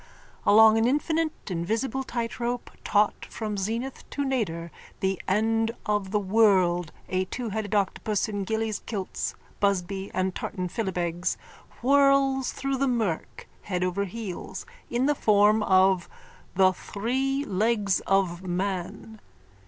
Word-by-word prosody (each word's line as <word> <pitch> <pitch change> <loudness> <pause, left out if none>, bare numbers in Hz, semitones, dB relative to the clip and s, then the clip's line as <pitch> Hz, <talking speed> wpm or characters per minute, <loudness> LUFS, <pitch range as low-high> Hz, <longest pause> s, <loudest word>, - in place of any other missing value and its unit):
Along 220 +1 +7
an 225 - +3
infinite 310 - -1
invisible 225 +10 -1
tightrope 240 0 -3
taut 205 0 +2
from 215 -2 -4
zenith 230 +7 -3
to 285 - -2
nadir 170 -11 -2 0.3
the 190 -1 -1
End 225 +3 +2 0.2
of 205 -2 0
the 210 +1 +1
World, 185 -5 +3 0.2
a 185 0 0
twoheaded 215 -1 -3
octopus 205 +1 0
in 205 -2 -3
gillie's 220 +1 -1
kilts, 200 -5 -4 0.2
busby 195 0 0
and 185 0 -1
tartan 180 -1 -4
filibegs, 175 -4 -2 0.5
whirls 275 -1 +4
through 275 0 -2
the 275 +1 +1
murk, 220 -10 -2
head 180 -2 -2
over 185 +2 0
heels, 200 -1 -6 0.2
in 240 +2 +1
the 295 - +3
form 210 -3 +4
of 190 -2 +3 0.5
the 185 0 +5
Three 265 +9 -2
Legs 205 -1 +1
of 190 -3 +2
Man.) 190 +4 -4
210 Hz, 125 wpm, -26 LUFS, 190-235 Hz, 0.5 s, Along